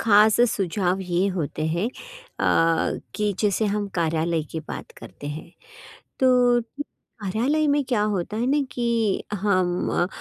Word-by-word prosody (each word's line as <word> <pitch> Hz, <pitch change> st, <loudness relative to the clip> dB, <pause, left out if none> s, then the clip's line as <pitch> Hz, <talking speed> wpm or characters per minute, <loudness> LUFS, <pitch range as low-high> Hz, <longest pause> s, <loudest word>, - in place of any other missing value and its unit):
खास 215 Hz, +1 st, +5 dB
सुझाव 190 Hz, -1 st, 0 dB
ये 180 Hz, 0 st, 0 dB
होते 155 Hz, -2 st, -2 dB
हैं 170 Hz, +6 st, 0 dB
अ, -, -, -1 dB, 0.2 s
कि 210 Hz, -1 st, 0 dB
जैसे 210 Hz, 0 st, +1 dB
हम 205 Hz, 0 st, -1 dB
कार्यालय 165 Hz, -1 st, 0 dB
की 160 Hz, -, -4 dB
बात 155 Hz, -, -8 dB
करते 115 Hz, +5 st, -10 dB
हैं। 155 Hz, +3 st, -6 dB, 0.7 s
तो 260 Hz, -, +4 dB, 0.3 s
उम, 240 Hz, -, +1 dB, 0.6 s
कार्यालय 245 Hz, +10 st, +1 dB
में 285 Hz, 0 st, +3 dB
क्या 240 Hz, -5 st, 0 dB
होता 185 Hz, +4 st, -3 dB
है 235 Hz, +3 st, 0 dB
ना 290 Hz, 0 st, +3 dB
कि 230 Hz, -4 st, 0 dB
हम 185 Hz, -3 st, +1 dB
200 Hz, 140 wpm, -24 LUFS, 170-230 Hz, 0.7 s, खास